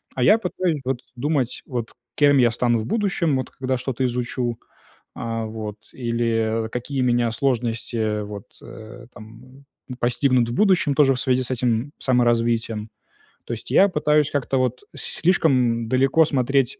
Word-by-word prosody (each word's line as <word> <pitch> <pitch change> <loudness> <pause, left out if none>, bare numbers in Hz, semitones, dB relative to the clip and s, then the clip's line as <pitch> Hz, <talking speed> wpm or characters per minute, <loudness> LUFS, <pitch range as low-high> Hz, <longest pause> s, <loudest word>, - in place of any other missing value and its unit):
а 125 - 0
я 215 - +6
пытаюсь 180 -6 -2
вот 130 -1 -2
думать, 135 -1 -1
вот 120 -4 -4 0.2
кем 145 -1 +4
я 120 -2 +5
стану 120 0 +1
в 110 - -4
будущем, 195 - 0
вот 130 - -4
когда 130 0 -2
что-то 130 0 -3
изучу, 120 -1 -2 0.6
а, 115 -1 -4
вот 110 -1 -6 0.2
или, 115 -2 -1
э, - - -7
какие 130 +3 -3
меня 120 -1 +2
сложности, 120 -2 -1
э, 105 -2 -1
вот, 100 -1 -8 0.2
э, 110 +2 -11
там, 125 +5 -14 0.2
ну, 125 - -7
постигнут 125 0 +2
в 120 - -3
будущем 185 -7 +3
тоже 135 -2 +4
в 125 - -1
связи 130 -1 +2
с 125 - -4
этим 125 +1 -1
саморазвитием. 115 -3 +1 0.6
То - - -4
есть 115 - -8
я 200 - +5
пытаюсь 150 -3 +2
как-то 135 -1 -1
вот 125 -1 -1
с - - -7 0.2
слишком 130 -9 +2
далеко 135 +5 +4
смотреть 135 -2 +1
125 Hz, 165 wpm, -22 LUFS, 115-135 Hz, 0.6 s, я